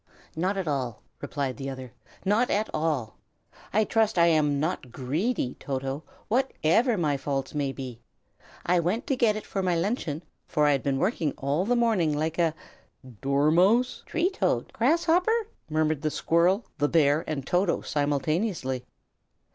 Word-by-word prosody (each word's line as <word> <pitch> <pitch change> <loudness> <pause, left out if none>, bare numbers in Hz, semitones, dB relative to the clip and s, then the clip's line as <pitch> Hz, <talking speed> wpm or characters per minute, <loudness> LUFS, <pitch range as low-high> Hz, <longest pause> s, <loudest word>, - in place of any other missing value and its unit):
"Not 185 +5 0
at 190 -4 -2
all!" 125 -7 -2 0.2
replied 140 -3 -3
the 135 0 -4
other, 130 -2 -8 0.3
"not 215 +6 +2
at 210 +2 0
all! 150 - -1 0.5
I 215 +2 +3
trust 220 -1 +1
I 170 - +6
am 150 -4 +3
not 150 -5 -2
greedy, 140 - -1
Toto, 135 +1 -3 0.3
whatever 235 - +2
my 150 -5 +1
faults 135 -1 -3
may 145 -2 -1
be. 130 -3 -8 0.6
I 180 0 +3
went 180 +8 -1
to 270 - 0
get 230 -4 +3
it 215 - -5
for 195 - -2
my 180 -2 +1
luncheon, 165 - -2 0.2
for 150 - +2
I 145 - +5
had 140 -2 +1
been 140 -2 0
working 165 - 0
all 145 +7 0
the 245 +3 +2
morning 205 -11 +2
like 160 +2 -2
a 165 -2 +2 0.3
" 125 -6 -18
"Dormouse!" 170 - +3
"Tree 345 +3 +1
toad!" 385 - -1
"Grasshopper!" 340 - +2 0.2
murmured 155 -1 +1
the 155 - 0
squirrel, 175 +8 +2
the 145 0 +2
bear, 150 -1 +3
and 140 -4 -3
Toto, 180 +3 +1
simultaneously. 145 - -1
160 Hz, 160 wpm, -27 LUFS, 140-210 Hz, 0.6 s, I